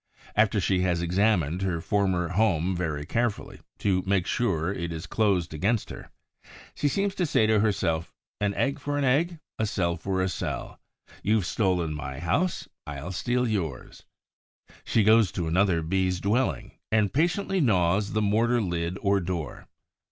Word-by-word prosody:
After 105 0 +3
she 95 0 +1
has 90 -2 +1
examined 90 -2 +1
her 90 -3 -1
former 95 -2 0
home 95 -3 +1
very 75 -4 -2
carefully, 120 +4 -2 0.2
to 95 -2 +1
make 95 -3 +2
sure 95 -6 0
it 85 -3 -4
is 80 +2 -5
closed 95 -7 +1
against 100 +8 0
her, - - -9 0.6
she 145 - 0
seems 200 +6 0
to 180 - 0
say 110 - +3
to 110 -1 +3
herself, 90 -6 0 0.3
"An 100 -1 0
egg 140 +1 0
for 145 +1 -2
an 145 - 0
egg, 160 +7 +2 0.2
a 110 - +1
cell 85 -4 -1
for 95 -1 -1
a - - +1
cell. - - -4 0.4
You've 105 -2 +1
stolen 90 -5 0
my 65 -3 -6
house; 90 - -1 0.2
I'll 75 +4 -5
steal 125 +6 0
yours." 85 - -3 0.8
She 110 - +2
goes 110 -3 +5
to 85 -3 -2
another 85 0 +2
Bee's 90 +1 0
dwelling 110 +7 0 0.2
and 110 -2 +2
patiently 175 +5 +1
gnaws 100 - +2
the 110 0 +1
mortar 115 +4 +2
lid 85 -3 -2
or 100 -1 +3
door. 85 -4 -5
95 Hz, 160 wpm, -26 LUFS, 85-110 Hz, 0.8 s, goes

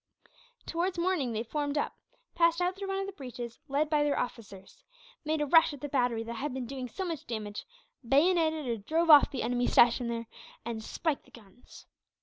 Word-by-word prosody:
Towards 350 +2 -2
morning 340 -8 0
they 225 0 -2
formed 290 +4 -2
up; - - -1 0.4
passed 335 0 +3
out 360 +1 0
through 390 0 -6
one 390 0 -2
of 390 - -2
the 395 - -6
breaches, 245 - -8
led 285 +3 +1
by 300 -1 +2
their 290 -1 +1
officers; 230 - -6 0.4
made 310 0 -1
a - - +2
rush 325 +1 +5
at 280 - -16
the 290 - -3
battery 245 -4 0
that 230 +1 -6
had 275 +1 -3
been 260 -2 -3
doing 260 0 -5
so 380 - -4
much 330 -5 -5
damage, 210 -3 -5 0.4
bayoneted 315 +3 +2
or 235 -1 -1
drove 320 +10 +2
off 295 -2 +8
the 270 -4 -3
enemy 245 +1 0
stationed 240 0 +4
there, 230 0 -3 0.4
and 230 -2 -4
spiked 310 +5 -2
the - - -21
guns. 220 +1 -16
285 Hz, 200 wpm, -30 LUFS, 235-330 Hz, 0.4 s, off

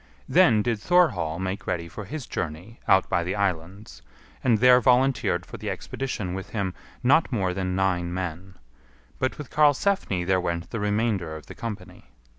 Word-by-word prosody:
Then 110 -2 +5
did 115 -2 -1
Thorhall 105 - +2
make 95 +2 -4
ready 85 -1 -2
for 100 +5 -8
his 145 +5 -6
journey 85 +9 -5
out 95 -1 +4
by 85 - +1
the 90 +2 -2
islands, 90 - -3 0.4
and 120 -4 +4
there 125 +2 +6
volunteered 125 0 +2
for - - -9
the - - -5
expedition 110 -9 -4
with 95 0 -6
him 100 -4 -2 0.3
not 145 +6 +4
more 95 -7 0
than 90 0 -2
nine 90 -2 0
men; 90 +1 -5 0.6
but 130 - -1
with 150 - -8
Karlsefni 150 - +2
there 95 0 +2
went 85 -1 -3
the 115 - -3
remainder 105 -5 0
of 80 - -10
the - - -10
company. 95 -5 -8
95 Hz, 170 wpm, -25 LUFS, 90-120 Hz, 0.6 s, there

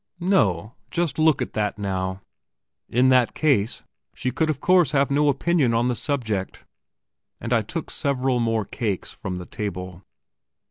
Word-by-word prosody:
No? 115 - +1 0.2
Just 170 -4 -1
look 155 -2 +4
at - - -8
that 105 -1 -1
now! 95 -1 -3 0.7
In 125 +2 +3
that 125 -2 +3
case, 125 -9 +1 0.3
she 130 - -2
could 160 +3 0
of 150 -3 -1
course 180 -5 +4
have 140 -1 +2
no 145 +1 +3
opinion 140 -3 +2
on 120 +2 +2
the 125 - 0
subject;... 110 -10 -3 0.7
and 120 0 -2
I 115 - +4
took 155 - -5
several 130 -2 0
more 115 -2 0
cakes 100 -2 -3
from 95 -2 -6
the 90 0 -6
table. 90 -3 -5
125 Hz, 155 wpm, -24 LUFS, 105-145 Hz, 0.7 s, look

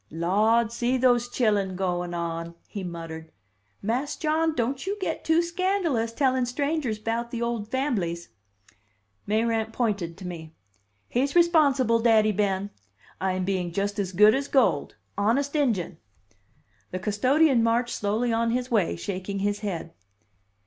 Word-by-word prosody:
"Lawd, 215 +8 +2
see 240 +2 0
those 245 -1 +3
chillun 205 -6 +1
goin' 180 -2 -2
on!" 170 0 -4
he 200 -3 -6
muttered. 165 -2 -7 0.5
"Mas' 250 +7 -1
John, 315 +1 0
don't 260 +6 -2
you 400 +2 -1
get 380 - -3
too 325 +1 +3
scandalous, 340 - 0
tellin' 260 0 +1
strangers 280 -2 -1
'bout 230 +2 -2
the 235 - -4
old 235 -3 -3
famblies." 205 -11 -2 1.0
Mayrant 220 +1 0
pointed 205 -8 -2
to 190 - -9
me. 160 -3 -8 0.5
"He's 270 +5 -1
responsible, 285 -9 +4
Daddy 220 -2 +4
Ben. 200 -1 -1 0.5
I'm 185 -1 -1
being 185 -3 -1
just 200 +3 -2
as 190 -2 -1
good 210 +4 +6
as 275 +2 -1
gold. 270 -2 +2 0.2
Honest 270 +8 +1
injun!" 220 - 0 0.9
The 185 - -4
custodian 255 +8 +3
marched 235 +1 +1
slowly 220 +4 0
on 230 0 +1
his 250 +2 -2
way, 205 -7 +2
shaking 195 +2 -4
his 205 +1 -1
head. 170 -5 -5
225 Hz, 140 wpm, -26 LUFS, 190-255 Hz, 1.0 s, good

